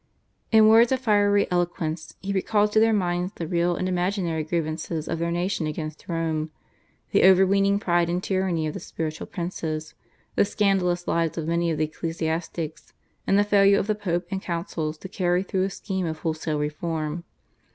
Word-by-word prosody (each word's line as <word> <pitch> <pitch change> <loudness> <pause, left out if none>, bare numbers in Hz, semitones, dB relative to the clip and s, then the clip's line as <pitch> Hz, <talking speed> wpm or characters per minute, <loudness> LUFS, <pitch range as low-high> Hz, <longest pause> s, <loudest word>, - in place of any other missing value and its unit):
In 220 -1 +7
words 230 +2 +6
of 260 - +2
fiery 205 -4 +3
eloquence 175 -2 -2
he 200 +1 -3
recalled 210 +2 +2
to 215 - +4
their 225 +1 +4
minds 180 -2 0
the 165 - -4
real 175 +1 +1
and 185 - -2
imaginary 180 -3 -1
grievances 155 0 -3
of 165 - -2
their 170 0 0
nation 175 -1 -1
against 155 0 -6
Rome, 160 -2 -1 0.6
the - - +4
over 190 0 +7
weening 195 +1 +3
pride 175 -4 +1
and 180 +2 -1
tyranny 185 -4 0
of 155 - -3
the - - -5
spiritual 155 -1 -5
princes, 160 -3 -4 0.4
the - - +4
scandalous 195 -4 +1
lives 165 -1 0
of 160 -1 -3
many 170 0 +1
of 160 - -1
the 155 - +1
ecclesiastics, 165 0 -4 0.3
and 195 - +4
the 205 - +5
failure 200 -1 +5
of - - 0
the 215 - +1
Pope 180 -4 -2
and 190 -1 -2
councils 165 -3 -3
to 190 - -8
carry 180 -2 0
through 190 -1 0
a - - -2
scheme 190 -2 -3
of 160 -1 -3
wholesale 155 -1 -2
reform. 155 +2 -3
175 Hz, 185 wpm, -25 LUFS, 160-195 Hz, 0.6 s, In